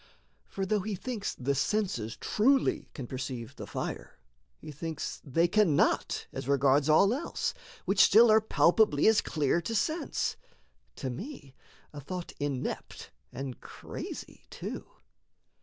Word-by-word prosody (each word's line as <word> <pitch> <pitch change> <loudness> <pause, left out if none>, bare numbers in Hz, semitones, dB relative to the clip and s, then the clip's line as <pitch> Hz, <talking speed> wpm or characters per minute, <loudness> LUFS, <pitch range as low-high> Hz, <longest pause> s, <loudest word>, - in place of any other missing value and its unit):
For, 195 - -3
though 210 +2 +1
he 205 +1 -3
thinks 215 +2 -4
The 135 +2 -1
senses 140 - -1
truly 265 +5 +2
can 135 - -5
perceive 130 -1 -5
the - - -8
fire, - - -5 0.4
He 150 - -9
thinks 155 +1 -5
they 165 +4 +2
cannot 185 -5 +2
as - - -5
regards 140 +1 +3
all 195 +8 +5
else, 285 +6 -2 0.3
Which 195 +2 0
still 225 +2 +7
are 220 0 +6
palpably 175 -6 +3
as 220 -1 +6
clear 155 +2 0
to 225 +7 -3
sense 310 +8 -1 0.6
To 130 - -4
me 175 - -8 0.4
a 145 - -7
thought 180 +4 -6
inept 140 -3 -4 0.2
and 130 0 -6
crazy - - -8
too. - - -6
165 Hz, 135 wpm, -30 LUFS, 140-215 Hz, 0.6 s, still